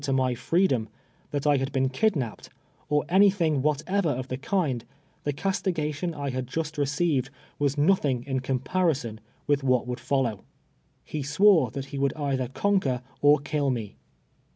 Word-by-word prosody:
to 140 -1 -2
my 130 -1 +2
freedom, 130 - +1 0.4
that 145 0 -3
I 150 - +5
]i;ul 140 - +3
hi.'L'n 135 0 0
ki(hia})i)ed, 135 - -1 0.4
or 150 0 +2
any 195 +3 +6
thing 165 -8 +1
Avhatever 155 +6 +1
of 130 0 -5
the 130 - -3
kiiuh 145 - 0 0.4
tlie 145 -1 -1
eastigation 170 -3 -1
I 140 -1 -2
liad 130 0 -3
just 155 +2 -3
received 145 -2 +1 0.3
was 145 0 +1
nothing 145 -6 +2
in 135 -2 -1
ciiinj)arison 130 -2 -1 0.3
with 145 -1 +2
what 130 -3 +2
wouM 125 -1 -3
f<jll<>V\'. 125 -4 0 0.7
lie 155 - -1
swore 155 - +4
tliat 135 +4 -5
he 140 - -7
W(»uhl 140 +2 0
either 135 -3 -1
cunnner 135 -4 0 0.2
or 145 +1 +6
kill 145 0 -1
me. 115 -5 -3
140 Hz, 160 wpm, -26 LUFS, 130-160 Hz, 0.7 s, any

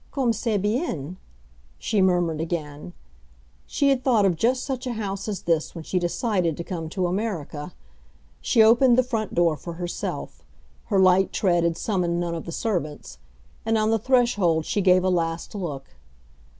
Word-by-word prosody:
"Comme 255 -4 +1
c'est 225 -1 -1
bien!" 195 - -2 0.6
she 215 -3 0
murmured 175 -4 +2
again; 160 -1 -5 0.7
she 280 - +1
had 265 -2 +1
thought 230 -6 +3
of 185 -3 +2
just 250 +9 +1
such 260 -2 -4
a 245 - -2
house 200 -3 -4
as 205 -4 -4
this 165 -1 0
when 165 - -7
she 180 - -1
decided 175 - -1
to 170 - -4
come 165 -3 -5
to 185 +1 -1
America. 175 -5 -3 0.7
She 225 - +4
opened 240 +2 +5
the 255 - +5
front 225 -4 -3
door 170 -2 +3
for 170 +4 -8
herself—her 165 - -5
light 190 0 +4
tread 175 -4 +1
had 170 -1 0
summoned 175 -5 -1
none 170 -1 -2
of 165 - -5
the 170 - -6
servants—and 150 - -4
on 215 0 +1
the 225 - +2
threshold 210 -10 +2
she 205 - 0
gave 185 -1 +4
a 185 - +2
last 165 -2 -1
look. 150 - -6
185 Hz, 165 wpm, -24 LUFS, 165-220 Hz, 0.7 s, opened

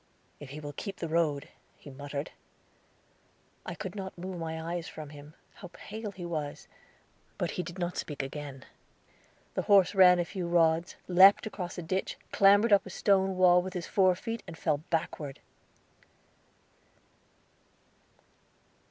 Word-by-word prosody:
"If 145 - -10
he 145 +3 -7
will 145 -1 -7
keep 195 +6 -6
the 170 - -4
road," 155 -3 0 0.3
he 145 - -12
muttered. 140 +2 -6 1.4
I - - -4
could 190 -3 -6
not 190 -3 -7
move 180 0 -6
my 160 -1 -4
eyes 170 +1 -4
from 150 -2 -9
him. 145 +1 -13 0.2
How 180 - -11
pale 215 +1 -7
he 185 -3 -8
was! 155 -4 -4 0.7
But - - -1
he - - -3
did 180 +1 -8
not 175 -1 -3
speak 145 -3 -4
again. 135 -1 -7 0.9
The - - -1
horse 200 -2 +5
ran 185 -2 +7
a 175 - 0
few 180 -1 -4
rods, 165 0 +2
leaped 190 +4 +7
across 185 -5 -5
a 175 - -4
ditch, 185 +4 -2
clambered 205 +3 +5
up 195 -1 +4
a - - -7
stone 190 0 +2
wall 180 -1 +6
with 185 +1 -7
his 175 -2 -3
fore 185 -2 +3
feet, 225 +4 -5
and 165 - -9
fell 155 -4 0
backward! 155 -4 -3
175 Hz, 150 wpm, -30 LUFS, 155-190 Hz, 1.4 s, ran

